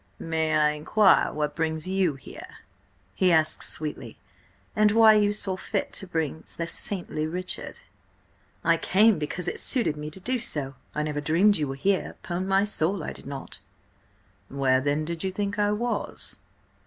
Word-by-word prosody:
"May 160 Hz, -1 st, -1 dB
I 150 Hz, 0 st, +4 dB
inquire 185 Hz, +7 st, +3 dB
what 150 Hz, -1 st, -2 dB
brings 160 Hz, 0 st, -2 dB
you 185 Hz, -5 st, +1 dB
here?" 130 Hz, -, -11 dB, 0.6 s
he 180 Hz, -, +3 dB
asked 160 Hz, -1 st, +2 dB
sweetly. 155 Hz, -1 st, -6 dB, 0.6 s
"And 215 Hz, -1 st, +4 dB
why 225 Hz, -1 st, +7 dB
you 205 Hz, -1 st, +3 dB
saw 200 Hz, -2 st, -2 dB
fit 280 Hz, +9 st, -3 dB
to 195 Hz, -, -2 dB
bring 160 Hz, -2 st, -2 dB
the 170 Hz, -, -2 dB
saintly 170 Hz, -3 st, -1 dB
Richard?" 180 Hz, +3 st, -3 dB, 0.8 s
"I -, -, +4 dB
came 215 Hz, +2 st, +4 dB
because 175 Hz, +4 st, -4 dB
it -, -, -3 dB
suited 235 Hz, -, +1 dB
me 150 Hz, 0 st, -6 dB
to 160 Hz, -, -8 dB
do 250 Hz, +6 st, -1 dB
so. 145 Hz, -, -3 dB, 0.2 s
I 150 Hz, -, 0 dB
never 150 Hz, -1 st, -2 dB
dreamed 180 Hz, +7 st, +3 dB
you 150 Hz, -, -1 dB
were 135 Hz, -, -4 dB
here— 190 Hz, +7 st, 0 dB
'Pon 180 Hz, +2 st, -3 dB
my 195 Hz, +1 st, +3 dB
soul, 195 Hz, -3 st, -1 dB
I -, -, -4 dB
did -, -, -11 dB
not!" 140 Hz, -1 st, -8 dB, 0.9 s
"Where 135 Hz, -1 st, +2 dB
then 145 Hz, +2 st, 0 dB
did 170 Hz, +1 st, -5 dB
you 190 Hz, -, -1 dB
think 205 Hz, +2 st, -3 dB
I 205 Hz, 0 st, +2 dB
was?" 220 Hz, 0 st, -3 dB
170 Hz, 170 wpm, -26 LUFS, 150-200 Hz, 0.9 s, why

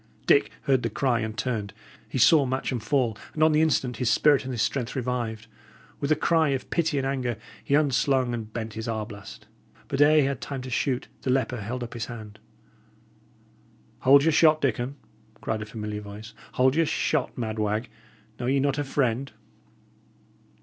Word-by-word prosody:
Dick -, -, +4 dB
heard 130 Hz, -2 st, +2 dB
the 115 Hz, -, -1 dB
cry 120 Hz, +1 st, 0 dB
and 110 Hz, -1 st, -4 dB
turned. 110 Hz, -4 st, -3 dB, 0.3 s
He -, -, -3 dB
saw 155 Hz, -3 st, +6 dB
Matcham 130 Hz, -1 st, -2 dB
fall; 120 Hz, -1 st, 0 dB, 0.2 s
and 155 Hz, -, +2 dB
on 155 Hz, -, +5 dB
the 155 Hz, 0 st, +3 dB
instant 135 Hz, -6 st, +1 dB
his 125 Hz, 0 st, 0 dB
spirit 145 Hz, -3 st, +4 dB
and 130 Hz, -, -4 dB
his 120 Hz, -4 st, 0 dB
strength 125 Hz, -2 st, -2 dB
revived; 120 Hz, -4 st, -3 dB, 0.5 s
With 140 Hz, +1 st, -2 dB
a -, -, +6 dB
cry 160 Hz, 0 st, +2 dB
of 135 Hz, -2 st, -3 dB
pity 165 Hz, -4 st, +1 dB
and 135 Hz, -, 0 dB
anger, 130 Hz, -4 st, -2 dB, 0.3 s
he 140 Hz, -, +1 dB
unslung 135 Hz, -3 st, +2 dB
and 110 Hz, -2 st, -5 dB
bent 110 Hz, -1 st, -5 dB
his 110 Hz, +1 st, -5 dB
arblast. 110 Hz, -1 st, -6 dB, 0.4 s
But 140 Hz, 0 st, 0 dB
ere 150 Hz, +1 st, +6 dB
he 150 Hz, -, +6 dB
had 135 Hz, -3 st, -2 dB
time 135 Hz, -3 st, -5 dB
to 130 Hz, -, -7 dB
shoot, 125 Hz, +1 st, -1 dB
the -, -, -3 dB
leper 125 Hz, -3 st, 0 dB
held 120 Hz, +5 st, -4 dB
up 120 Hz, -, -7 dB
his 115 Hz, -3 st, -4 dB
hand. 110 Hz, -3 st, -9 dB, 1.6 s
"Hold 140 Hz, +2 st, +6 dB
your 160 Hz, -, +4 dB
shot, 155 Hz, 0 st, +5 dB
Dickon!" 130 Hz, -1 st, -1 dB, 0.4 s
cried 110 Hz, -1 st, -3 dB
a 110 Hz, -, -6 dB
familiar 105 Hz, -1 st, -5 dB
voice. 105 Hz, +2 st, -10 dB, 0.2 s
"Hold 130 Hz, +1 st, +3 dB
your 165 Hz, +1 st, +2 dB
shot, 150 Hz, -2 st, -1 dB
mad 110 Hz, -2 st, -3 dB
wag! 105 Hz, +3 st, -1 dB, 0.5 s
Know 120 Hz, -, -2 dB
ye 135 Hz, +2 st, +2 dB
not 140 Hz, +1 st, 0 dB
a -, -, 0 dB
friend?" 135 Hz, -1 st, -1 dB
125 Hz, 185 wpm, -26 LUFS, 110-140 Hz, 1.6 s, saw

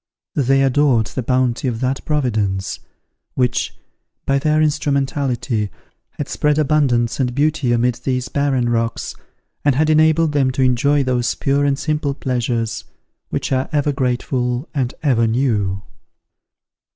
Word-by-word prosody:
They 135 Hz, 0 st, +2 dB
adored 135 Hz, -4 st, +3 dB
the 130 Hz, -, -4 dB
bounty 125 Hz, +1 st, 0 dB
of 115 Hz, -3 st, -2 dB
that 130 Hz, +1 st, -1 dB
Providence, 105 Hz, -10 st, -1 dB, 0.6 s
which, 125 Hz, -1 st, 0 dB, 0.5 s
by 140 Hz, 0 st, +2 dB
their 155 Hz, +2 st, +2 dB
instrumentality, 140 Hz, -7 st, 0 dB, 0.5 s
had -, -, -3 dB
spread 150 Hz, 0 st, +1 dB
abundance 135 Hz, -6 st, +2 dB
and 125 Hz, -2 st, 0 dB
beauty 145 Hz, -3 st, +1 dB
amid 120 Hz, +1 st, +2 dB
these 125 Hz, -1 st, -1 dB
barren 135 Hz, -3 st, 0 dB
rocks, 115 Hz, -1 st, -1 dB, 0.5 s
and 145 Hz, -3 st, +3 dB
had 155 Hz, +3 st, +2 dB
enabled 155 Hz, +1 st, +4 dB
them 140 Hz, -3 st, +2 dB
to 130 Hz, -, +1 dB
enjoy 140 Hz, +3 st, +2 dB
those 125 Hz, -2 st, 0 dB
pure 140 Hz, +1 st, +1 dB
and 140 Hz, -1 st, +1 dB
simple 150 Hz, -2 st, -1 dB
pleasures, 120 Hz, -4 st, -2 dB, 0.5 s
which -, -, -3 dB
are 130 Hz, 0 st, 0 dB
ever 145 Hz, -1 st, +1 dB
grateful 125 Hz, 0 st, -1 dB
and 130 Hz, -4 st, -1 dB
ever 120 Hz, -6 st, +3 dB
new. 105 Hz, -6 st, 0 dB
130 Hz, 135 wpm, -19 LUFS, 120-145 Hz, 0.6 s, enabled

